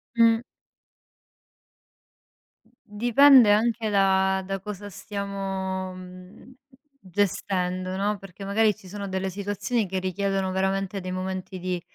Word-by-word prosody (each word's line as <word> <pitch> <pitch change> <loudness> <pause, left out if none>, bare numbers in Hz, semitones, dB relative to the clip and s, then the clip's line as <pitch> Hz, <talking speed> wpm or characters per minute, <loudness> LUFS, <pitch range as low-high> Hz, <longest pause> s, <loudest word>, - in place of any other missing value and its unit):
Mh. 230 0 +5 2.2
Mhmm, 230 - -30
dipende 240 +2 +6
anche 225 +1 +2
da 190 -1 +3
da 195 +1 -3
cosa 205 0 -7
stiamo, 195 -2 -4
mhmm, 185 +5 -12 0.5
gestendo, 185 -2 -1
no, 205 +2 0
perché 195 0 -11
magari 210 +1 +2
ci 205 -3 -16
sono 200 +1 -6
delle 190 0 -2
situazioni 205 +3 -2
che 190 +1 -2
richiedono 190 +1 -1
veramente 195 +1 -1
dei 185 -1 -5
momenti 185 0 -4
di, 180 -1 -3
195 Hz, 115 wpm, -25 LUFS, 185-205 Hz, 2.2 s, dipende